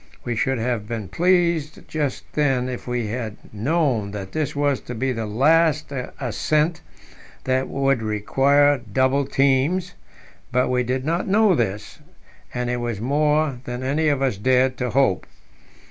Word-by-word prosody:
We 120 - -2
should 135 +3 0
have 115 -2 -2
been 110 -5 -5
pleased 170 - +1
just 150 -4 -2
then 135 -4 +1
if 125 -1 -6
we 125 -2 -1
had 110 -2 -4 0.2
known 125 -2 0
that 95 -2 -6
this 150 -2 -2
was 145 -2 +1
to 125 - -7
be 130 +3 -1
the 115 -3 -3
last 155 +7 +2 0.3
ascent 150 +6 0 0.6
that 130 0 0
would 135 -3 +1
require 135 +7 +3
double 130 +4 +2
teams; 140 +8 +1 0.6
but 125 +1 +2
we 125 0 +2
did 130 +2 -2
not 170 +3 -1
know 205 0 +4
this, 105 - -2 0.5
and 125 0 -3
it 125 0 -1
was 120 -4 -3
more 150 +2 +1
than 125 +1 -5
any 150 +4 +1
of 140 -2 +1
us 130 -7 0
dared 130 +4 +2
to 125 0 -2
hope. 125 -8 +1
130 Hz, 155 wpm, -22 LUFS, 120-150 Hz, 0.6 s, know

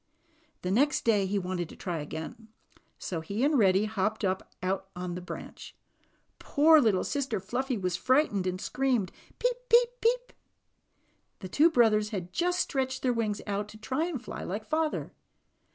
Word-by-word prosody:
The 180 - -1
next 280 +8 +2
day 205 -4 +3
he 200 +2 0
wanted 180 -3 -3
to - - -11
try 175 -4 -4
again. 160 +9 -7 0.5
So 170 -3 -4
he 200 +9 -3
and 295 +2 +3
Reddy 195 0 +4
hopped 215 0 -1
up 190 0 -2
and 185 +1 -1
out 195 0 -3
on 180 0 -4
the 180 - -5
branch. 180 - -9 0.6
Poor 310 +1 +5
little 210 -7 +2
sister 270 -7 -1
Fluffy 245 +6 -2
was 180 -3 -1
fright 270 +5 +3
ened 195 -3 -1
and 185 0 -2
screamed, 245 -6 0 0.3
'^peep, - - +1
peep, 475 +1 +6
peep!" - - +1 1.1
The 185 - -6
two 310 - +5
brothers 220 -7 +3
had 185 -4 -5
just 360 +1 +1
stretched 260 -2 -2
their 250 -2 +2
wings 215 -3 -2
out 205 0 -2
to 215 - -12
"try 275 +10 -2
to 300 - -2
fly 245 - -7
like 205 +4 -4
father." 315 0 -1
215 Hz, 175 wpm, -29 LUFS, 190-275 Hz, 1.1 s, peep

